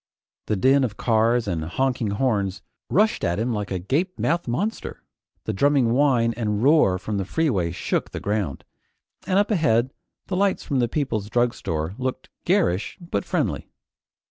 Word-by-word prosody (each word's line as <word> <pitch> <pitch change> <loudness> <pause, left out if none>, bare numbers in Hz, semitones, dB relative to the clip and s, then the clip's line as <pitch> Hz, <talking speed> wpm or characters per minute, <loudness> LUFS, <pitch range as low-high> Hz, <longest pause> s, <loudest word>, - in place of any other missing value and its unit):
The 105 - +1
din 135 +7 +4
of 110 -5 -2
cars 115 0 +2
and 85 -5 -2
honking 120 +6 -1
horns 100 -3 -1 0.3
rushed 215 +4 +2
at 85 0 0
him 115 +3 -1
like 105 -2 -3
a 95 - -2
gape 145 - -1
mouthed 170 -2 0
monster; 200 - -3 0.4
the - - -2
drumming 140 +1 +3
whine 125 -4 +3
and 105 -2 -1
roar 140 - +4
from 100 +2 -3
the - - 0
freeway 100 - 0
shook 85 - -2
the - - -6
ground, 100 -9 -2 0.6
and 185 - +2
up 205 +2 +2
ahead 130 - +2 0.3
the 185 - -3
lights 195 -3 0
of 135 - +2
the 120 - +2
People's 115 -6 -2
Drugstore 95 -9 -1
looked 130 0 -3 0.2
garish 90 +4 +1
but 170 - -3
friendly. - - -2
120 Hz, 165 wpm, -23 LUFS, 100-140 Hz, 0.6 s, din